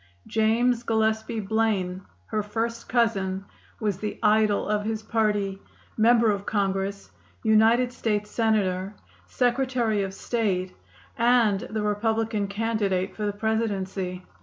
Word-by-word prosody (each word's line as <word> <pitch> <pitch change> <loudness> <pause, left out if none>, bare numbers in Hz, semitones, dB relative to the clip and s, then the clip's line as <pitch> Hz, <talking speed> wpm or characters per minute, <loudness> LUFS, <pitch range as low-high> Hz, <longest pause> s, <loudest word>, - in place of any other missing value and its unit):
James 230 +2 +2
Gillespie 220 -1 0
Blaine, 200 -3 0 0.2
her 215 - -1
first 230 +2 -3
cousin, 195 -5 +1 0.3
was 205 -4 -1
the 210 0 -4
idol 215 -1 +3
of 210 0 0
his 220 0 -3
party, 210 -3 0 0.4
member 230 0 +4
of 200 -1 -2
Congress, 195 - -2 0.3
United 225 +3 +4
State 210 -3 -1
Senator, 205 -3 0 0.3
Secretary 245 -4 +1
of 195 -1 -4
State, 195 -7 -1 0.4
and 230 -4 +4
the 215 -1 -2
Republican 220 0 0
candidate 200 -3 -1
for 210 -1 -2
the 205 - -1
Presidency. 195 -4 -2
215 Hz, 115 wpm, -26 LUFS, 200-225 Hz, 0.4 s, member